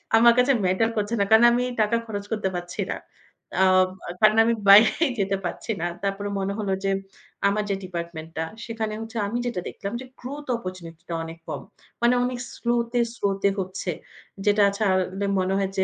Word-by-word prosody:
আমার 235 +1 +7
কাছে 250 +2 +5
ম্যাটার 190 +5 +2
করছে 210 +2 -1
না - - +4
কারণ 220 +2 +7
আমি 245 +1 +2 0.2
টাকা 215 +2 +2
খরচ 205 -2 -5
করতে 210 -3 0
পারছি 175 0 -4
না। - - -3 0.6
আ - - +7 0.4
আ - - -4
কারণ 215 +1 +6
আমি 230 +1 +2 0.2
বাইরেই 225 +9 +7
যেতে 195 0 +1
পারছি 200 - -4
না। - - 0 0.2
তারপরে 200 +1 -2
মনে 195 +1 -1
হলো 200 -2 -1
যে 195 - +1 0.6
আমার 210 +1 +1
যে 195 - +1
ডিপার্টমেন্ট 170 -3 -6
টা, 160 - 0 0.2
সেখানে 225 -2 -3
হচ্ছে 225 +1 -7
আমি 235 +4 -2
যেটা 235 -7 -2
দেখলাম 200 +3 -6
যে - - -8
গ্রোথ 285 +4 -7
অপরচুনিটি 175 -6 -8
টা - - -2
অনেক 165 0 -8
কম। - - -4 0.4
মানে 240 +1 +4
অনেক 250 0 -2 0.2
স্লো 235 0 0 0.2
তে, 245 - +1 0.2
স্লো 200 - 0 0.2
তে 200 - +5
হচ্ছে। 185 -1 -3 0.5
যেটা 205 0 +4
ছাড়লে 190 -1 0
মনে 185 +1 0
হয় 195 -1 0
যে 190 - +3
200 Hz, 195 wpm, -25 LUFS, 185-230 Hz, 0.6 s, আমার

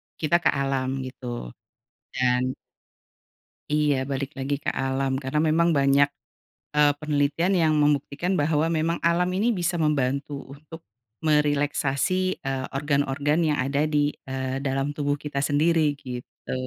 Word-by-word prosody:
kita 170 +2 +2
ke - - +1
alam 135 -1 0
gitu. 120 - -6 0.6
Dan 125 0 +1 1.2
Iya 150 -2 +3 0.2
balik 135 0 -2
lagi 135 +2 -2
ke - - +1
alam, 135 0 0
karena 135 +3 -1
memang 165 +2 +3
banyak, 140 +1 +4 0.7
eee, 150 -1 +5
penelitian 150 +4 +1
yang 155 -1 +3
membuktikan 145 +4 +1
bahwa 150 +2 +2
memang 165 +1 0
alam 175 +2 +2
ini 215 +4 +1
bisa 175 0 -1
membantu 140 -2 0 0.2
untuk 160 +3 -12 0.4
merelaksasi, 145 +1 +1 0.3
eee, 135 -1 -2
organ-organ 145 +1 +1
yang 150 -1 +1
ada 140 +3 0
di, 150 -1 +1 0.2
eee, 130 0 -3
dalam 135 +1 -1
tubuh 145 -1 -1
kita 145 -1 -4
sendiri, 150 +1 +2
gitu. 125 -3 -9
145 Hz, 130 wpm, -25 LUFS, 135-155 Hz, 1.2 s, eee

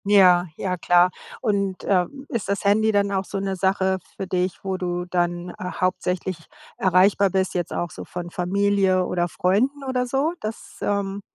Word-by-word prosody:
Ja, 185 -3 +6
ja, 185 -2 -2
klar. 175 +1 +4 0.3
Und, 200 -5 -1
äh, 185 -3 +3 0.2
ist 225 -4 -3
das 200 - -1
Handy 220 +2 +4
dann 200 -1 +2
auch 190 -1 0
so 200 - -5
'ne 195 0 -2
Sache 190 0 +1 0.2
für 195 - -3
dich, 180 0 -2
wo 190 -1 -2
du 180 -1 -2
dann 175 0 -1
hauptsächlich 185 0 -1 0.4
erreichbar 190 +2 +4
bist, 190 0 0
jetzt 175 -2 -2
auch 175 -2 -2
so - - -8
von 175 -1 -7
Familie 190 0 +2
oder 175 -1 0
Freunden 230 - 0
oder 255 -2 -1
so? 275 +6 0
Dass, 215 +1 -7
ähm 200 -1 -1
190 Hz, 170 wpm, -23 LUFS, 180-200 Hz, 0.4 s, Ja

